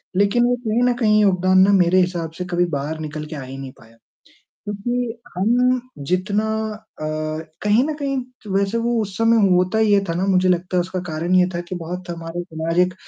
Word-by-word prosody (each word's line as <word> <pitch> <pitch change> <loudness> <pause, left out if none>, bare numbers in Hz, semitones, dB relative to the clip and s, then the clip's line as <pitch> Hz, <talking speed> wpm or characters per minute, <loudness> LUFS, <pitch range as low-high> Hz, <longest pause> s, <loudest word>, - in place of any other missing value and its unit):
लेकिन 205 +5 +3
वो 245 0 +2
कहीं 225 +3 +1
न - - +1
कहीं 215 -2 +4
योगदान 185 -1 +3
ना 200 - +4
मेरे 180 +1 +4
हिसाब 175 -3 -2
से 180 - -4
कभी 175 0 +2
बाहर 155 +3 -4
निकल 155 0 -5
के 155 +1 -8
आ 140 - -6
ही 130 +1 -8
नहीं 135 -1 -7
पाया। 115 0 -19 0.7
क्योंकि 230 +3 -3 0.2
हम 245 +6 +2 0.3
जितना 200 +4 +1 0.5
अ, - - -4 0.6
कहीं 210 +5 +3
न 310 - -2
कहीं 275 -3 -2 0.2
तो 205 - -8
वैसे 200 +3 +1
वो 235 0 0
उस 195 -2 -6
समय 225 -3 +4
होता 180 +4 +2
ये 205 -2 +3
था 165 - -1
ना 185 +3 -1
मुझे 185 -1 +3
लगता 180 +1 0
है - - +4
उसका 185 +1 -3
कारण 170 +4 -1
ये 180 - +5
था 170 - -1
कि - - -4
बहुत 175 +1 -6
हमारे 170 0 -5
समाज 165 -1 -3
एक 185 - -8
185 Hz, 210 wpm, -21 LUFS, 175-215 Hz, 0.7 s, ये